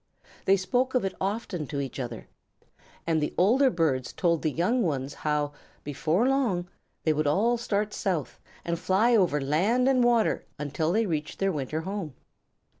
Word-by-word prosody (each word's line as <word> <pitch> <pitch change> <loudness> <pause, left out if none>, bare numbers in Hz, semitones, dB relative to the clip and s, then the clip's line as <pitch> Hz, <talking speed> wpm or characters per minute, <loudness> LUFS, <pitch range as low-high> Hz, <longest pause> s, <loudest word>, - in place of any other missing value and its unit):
They 195 +1 +5
spoke 245 +8 0
of 250 - +2
it 190 - -2
often 195 - -2
to 140 - -4
each 135 0 -4
other, 120 -3 -6 0.8
and 160 -2 +1
the 150 - -2
older 250 +9 +4
birds 150 - 0
told 170 -3 +1
the 155 - +1
young 195 - +1
ones 140 - -1
how, 150 -1 -1 0.3
before 155 - 0
long, 235 -11 +1 0.4
they 155 - +3
would 150 0 0
all 215 +11 +3
start 210 -3 -1
South, 175 -8 -2 0.3
and 170 -1 -2
fly 215 +7 +3
over 175 -8 +3
land 190 - +2
and 260 -2 +4
water 235 -2 +2
until 150 +2 -1
they 220 +4 +2
reached 155 -5 -3
their 195 0 +1
winter 150 0 -3
home. 185 -6 -5
175 Hz, 170 wpm, -27 LUFS, 150-220 Hz, 0.8 s, They